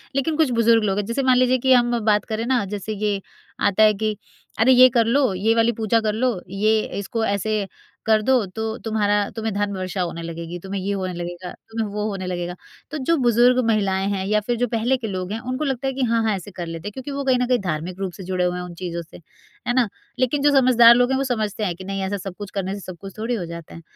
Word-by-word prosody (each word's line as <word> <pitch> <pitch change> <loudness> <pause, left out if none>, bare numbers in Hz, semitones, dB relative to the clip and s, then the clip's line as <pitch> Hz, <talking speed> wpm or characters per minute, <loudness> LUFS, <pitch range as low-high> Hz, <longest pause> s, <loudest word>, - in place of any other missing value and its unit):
लेकिन 300 +3 0
कुछ 315 -5 +3
बुज़ुर्ग 230 -1 +4
लोग 195 -1 0
हैं, 205 - -1
जैसे 235 +5 -1
मान 255 -1 +4
लीजिए 255 0 +4
कि 260 - +7
हम 240 -1 +3
बात 210 -1 +3
करें 220 0 -3
ना, 250 -2 +1
जैसे 205 +2 -5
ये 205 -1 -1 0.5
आता 205 +2 +3
है 215 0 +6
कि 215 +1 -2 0.4
"अरे 235 +4 +5
ये 255 +1 +8
कर 235 -2 +2
लो, 255 -1 +2
ये 215 +5 +1
वाली 230 0 +3
पूजा 225 0 +1
कर 215 -1 0
लो, 235 -2 0
ये 215 +3 +2 0.2
इसको 225 +3 -2
ऐसे 200 0 -1 0.4
कर 220 -1 +4
दो, 255 -5 +4
तो 220 +4 -4
तुम्हारा 205 -2 +1
तुम्हें 225 -1 -2
धन 205 0 -1
वर्षा 185 0 -3
होने 170 -1 -3
लगेगी, 170 +1 -6
तुम्हें 195 +2 -5
ये 195 +2 -2
होने 185 -2 -3
लगेगा, 175 +1 -6 0.2
तुम्हें 225 -1 -2
वो 210 0 -2
होने 195 -2 -4
लगेगा।" 175 -1 -3 0.4
तो 315 - -3
जो 300 +5 +1
बुज़ुर्ग 245 0 +4
महिलाएँ 195 -3 +1
हैं 190 -1 -2
या 210 +2 +2
फिर 240 - +1
जो 245 +1 +1
पहले 235 +3 +1
के 230 - -5
लोग 185 -2 -4
हैं, 220 - -3
उनको 255 +4 -3
लगता 270 -1 -2
है 270 - -1
कि 265 0 -2
हाँ 230 - +3
हाँ 215 -2 +1
ऐसे 190 +2 -8
कर 175 -2 -6
लेते 165 +3 -6
हैं, - - -4
क्योंकि 265 +4 -7
वो 280 0 -3
कहीं 260 -2 +3
न 250 - +1
कहीं 250 -2 +2
धार्मिक 175 +4 -3
रूप 190 -2 -2
से 190 - -9
जुड़े 180 0 -1
हुए 180 0 0
हैं 180 - -4
उन 180 -1 -8
चीज़ों 170 -2 -3
से। 165 - -13 0.5
है 245 - +2
ना? 245 -3 +3 0.3
लेकिन 255 +3 +1
जो 290 +1 +4
समझदार 240 -2 +7
लोग 245 +2 +3
हैं, 265 - +2
वो 275 - 0
समझते 220 -5 -2
हैं 175 -3 -2
कि 185 - -10
नहीं 195 +1 -4
ऐसा 195 +1 -2
सब 190 -1 -7
कुछ 205 -2 -7
करने 195 -1 -3
से 205 - -5
सब 185 -3 -9
कुछ 195 0 -10
थोड़ी 225 +3 -2
हो 180 - -3
जाता 170 -1 -9
है, 165 - -10
215 Hz, 265 wpm, -22 LUFS, 190-240 Hz, 0.5 s, ये